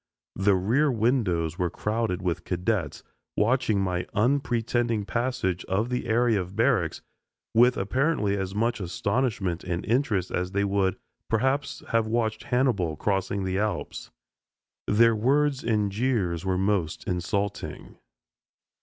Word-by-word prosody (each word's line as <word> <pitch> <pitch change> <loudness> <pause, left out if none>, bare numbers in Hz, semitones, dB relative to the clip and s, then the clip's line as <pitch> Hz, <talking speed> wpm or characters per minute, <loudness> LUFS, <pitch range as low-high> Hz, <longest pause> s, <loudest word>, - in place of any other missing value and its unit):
The 100 0 +3
rear 120 +11 +2
windows 105 - 0
were 90 -1 +1
crowded 105 -1 -2
with 90 -1 -1
cadets 90 -3 -2 0.3
watching 110 -1 +2
my 90 -2 -1
unpretending 120 -2 +1
passage 120 -7 -1
of 105 +6 0
the 125 -1 -2
area 115 -2 +2
of 90 +2 -8
barracks 115 - +1 0.5
with 120 +2 +5
apparently 105 0 +1
as 95 -1 -3
much 115 +2 0
astonishment 100 -1 -1
and 90 -1 -3
interest 110 -6 0
as 90 +1 -2
they 100 +1 +1
would, 100 -2 +1 0.3
perhaps, 130 +5 0
have 115 -2 +2
watched 110 -1 -1
Hannibal 120 - +1
crossing 95 +3 -1
the 95 +1 -1
Alps. 105 -4 -3 0.8
Their 115 +2 +5
words 140 +5 +2
and 105 -3 +1
jeers 100 -7 0
were 95 -1 0
most 95 -4 -1
insulting. 95 +3 -3
105 Hz, 130 wpm, -26 LUFS, 95-120 Hz, 0.8 s, with